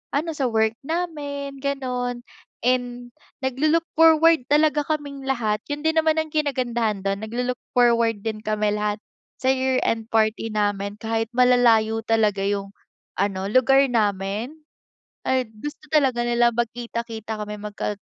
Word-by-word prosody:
ano 320 +4 0
sa 280 -3 -1
work 220 0 +1
namin, 285 -4 -4
ganun 250 -3 -2 0.4
and 245 -1 -1 0.3
naglo-look 305 +6 +1
forward 325 -2 +5
talaga 300 0 +3
kaming 285 -2 -4
lahat. 230 -6 -1
Yun 290 - -2
din 320 0 +1
naman 315 0 +2
ang 315 -1 -3
kinagandahan 240 -8 -1
dun, 195 0 -1
naglo-look 245 +3 -3 0.2
forward 235 -3 +3
din 220 -1 -3
kami 215 -1 0
lahat, 210 0 -1 0.4
sa 260 - -2
year-end 260 -4 0
party 220 0 +1
namin. 205 -1 -1
Kahit 225 +1 -2
malalayo 230 -3 +4
talaga 215 -3 +1
yung 200 0 -2 0.5
ano, 195 -1 -1
lugar 265 +3 +5
namin? 210 +2 -1 0.7
Ay, 260 -2 +1
gusto 295 +9 -8
talaga 265 -6 +3
nilang 240 -1 +2
magkita-kita 230 -2 -4
kami, 210 0 -6
mag 210 -1 -7
gad 205 -1 -3
240 Hz, 135 wpm, -23 LUFS, 215-275 Hz, 0.7 s, forward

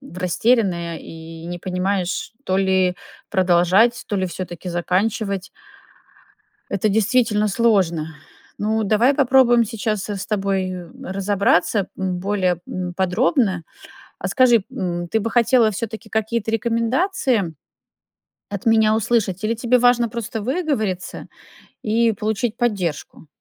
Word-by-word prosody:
растерянная 180 -3 +1
и 165 +1 -10
не 175 0 -5
понимаешь, 185 +2 -2
то 190 0 +1
ли 190 -2 +2 0.3
продолжать, 185 +5 +3
то 205 - -2
ли 190 -1 0
всё-таки 180 0 -6
заканчивать. 195 +3 -1 1.2
Это 200 +2 +1
действительно 215 0 +2
сложно. 180 -8 +1 0.4
Ну, 220 +1 0
давай 220 +7 +3
попробуем 250 -3 +5
сейчас, 215 -2 -3
э, 205 - -2
с 190 - -5
тобой 195 -3 -1 0.3
разобраться, 195 0 +1
м, 185 -2 -2
более, 185 -3 0
м, 180 -1 -4
подробно. 190 - +1 0.6
А - - -3
скажи, 240 -6 +4
м, 175 -2 -3
ты 220 - 0
бы 230 - -2
хотела 235 -2 +4
всё-таки 220 +2 -6
какие-то 220 0 -1
рекомендации 230 - 0 1.0
от 200 +2 -6
меня 220 -1 +4
услышать 215 -4 0
или 230 +2 +1
тебе 240 +2 +2
важно 240 -1 +3
просто 225 0 -5
выговориться 245 - -2 0.5
и 225 +1 +2
получить 215 +2 -2
поддержку? 185 - -2
205 Hz, 120 wpm, -21 LUFS, 185-230 Hz, 1.2 s, попробуем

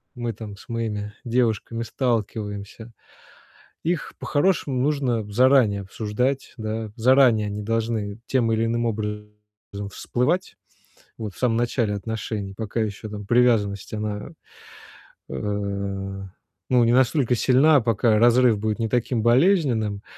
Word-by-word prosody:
мы 120 -1 -3
там 105 -1 -8
с - - -16
моими 105 -3 -3
девушками 115 -1 0
сталкиваемся, 110 -2 -3 0.9
их 170 -1 -2
по-хорошему 145 -4 0
нужно 135 -5 0
заранее 120 -3 +4
обсуждать, 115 +7 -2
да. 110 -1 -4
Заранее 120 -3 +4
они 105 0 -4
должны, 110 -1 -2
тем 120 -4 +1
или 110 0 +1
иным 120 +1 0
образом, 105 -1 -3 0.6
всплывать, 145 - -1 0.6
вот, 105 -4 -6
в - - -17
самом 120 -3 +1
начале 120 -2 0
отношений, 105 -1 -4
пока 110 +1 -3
ещё, 110 0 -3
там, 105 -1 -7
привязанность, 110 -4 +2
она, 105 -1 -4 1.0
э, - - -6 1.4
ну 125 -1 +5
не 115 - +3
настолько 130 0 +3
сильна, 135 +5 +5
пока 110 -1 +2
разрыв 120 -1 +5
будет 110 0 -1
не 115 -1 -1
таким 120 -1 0
болезненным. 120 - +2
115 Hz, 120 wpm, -23 LUFS, 105-125 Hz, 1.4 s, ну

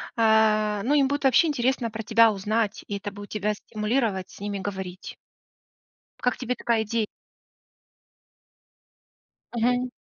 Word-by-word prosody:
э, 215 -2 +3
ну 275 - +1
им 280 -2 +4
будет 285 +1 -2
вообще 270 +6 +5
интересно 250 -4 0
про 220 +1 -5
тебя 230 +1 +5
узнать, 210 +1 -1
и 200 - -3
это 205 +1 -6
будет 205 +1 -10
тебя 210 0 -1
стимулировать 210 -2 -2
с - - -14
ними 205 0 -4
говорить. 190 -2 -6 1.0
Как 250 -2 +1
тебе 250 0 -2
такая 230 -3 0
иде? 220 0 -1 2.5
Мгм. 245 +2 +1
220 Hz, 130 wpm, -25 LUFS, 205-245 Hz, 2.5 s, вообще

